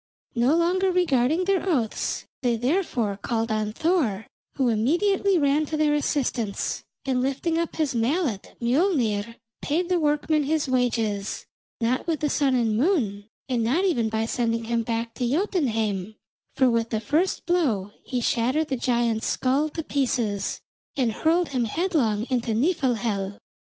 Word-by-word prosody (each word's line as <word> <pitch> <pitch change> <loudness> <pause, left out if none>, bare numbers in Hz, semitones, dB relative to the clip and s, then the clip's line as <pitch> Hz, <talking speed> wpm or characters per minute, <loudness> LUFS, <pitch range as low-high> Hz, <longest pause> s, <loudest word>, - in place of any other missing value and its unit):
No 245 +5 +3
longer 370 +3 +2
regarding 320 -2 +2
their 390 -1 +1
oaths, 240 -10 -1 0.2
they, 245 -3 +2
therefore, 245 - 0
called 225 0 -1
on 215 -1 -1
Thor, 265 - 0 0.3
who 265 -3 +1
immediately 360 - +2
ran 295 0 +2
to 310 - -2
their 305 -1 +3
assistance, 255 -8 -1 0.2
and 260 -2 +1
lifting 280 +5 0
up 335 - -2
his 310 -4 0
mallet 240 - -1
Mjolnir 235 - +1 0.3
paid 345 +5 -1
the 360 -1 +2
workman 300 0 +1
his 305 0 0
wages, 230 -6 -1 0.3
not 245 +5 0
with 320 -3 -1
the 295 - +1
sun 275 -3 +2
and 230 -3 +1
moon, 220 - 0 0.2
and 245 -4 0
not 295 +12 +2
even 240 - +1
by 220 0 -1
sending 230 -1 -1
him 230 +1 0
back 230 0 -3
to 245 0 -2
Jotunheim, 225 - 0 0.4
for 260 - +4
with 230 -1 +1
the 220 - -1
first 305 - 0
blow 250 - +1
he 250 -1 -2
shattered 255 +7 +1
the 265 - -1
giant's 235 -2 0
skull 275 +4 +1
to 325 +2 -5
pieces, 235 -9 -1 0.4
and 250 -4 +2
hurled 330 +8 +1
him 255 -4 0
headlong 235 - 0
into 235 -3 0
Nifelhel. 230 - 0
255 Hz, 150 wpm, -25 LUFS, 225-315 Hz, 0.4 s, for